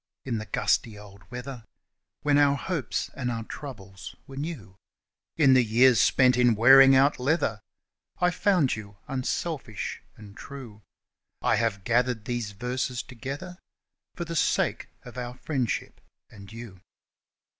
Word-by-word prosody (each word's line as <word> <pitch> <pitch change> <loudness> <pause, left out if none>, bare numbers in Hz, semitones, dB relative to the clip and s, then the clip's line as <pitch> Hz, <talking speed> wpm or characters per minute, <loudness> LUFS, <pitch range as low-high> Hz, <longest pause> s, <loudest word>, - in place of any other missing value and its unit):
In 120 -4 -2
the 110 - -7
gusty 105 +2 0
old 100 -1 -15
weather, 125 0 -7 0.6
When 145 -1 +3
our 140 -1 +4
hopes 145 -2 -3
and 125 -3 -3
our 115 -1 -3
troubles 100 -8 -9
were 135 - -11
new, 135 - -6 0.6
In 140 -5 +6
the 130 -1 +5
years 120 0 +5
spent 125 +3 +4
in 120 -2 +4
wearing 135 +4 +8
out 135 +1 +4
leather, 125 -6 0 0.6
I 180 0 +2
found 180 - +2
you 100 -2 -10
unselfish 135 - -3 0.2
and 105 -2 -13
true 120 -7 -10 0.6
I - - +3
have 110 -4 -1
gathered 120 -1 +1
these 120 -3 -3
verses 125 +3 -3
together 140 +9 -7 0.6
For 170 - -4
the 165 0 -5
sake - - +1 0.2
of 125 0 -9
our 120 0 -5
friendship 130 -3 -3 0.3
and 100 -2 -13
you. 110 -5 -10
125 Hz, 140 wpm, -27 LUFS, 110-140 Hz, 0.6 s, wearing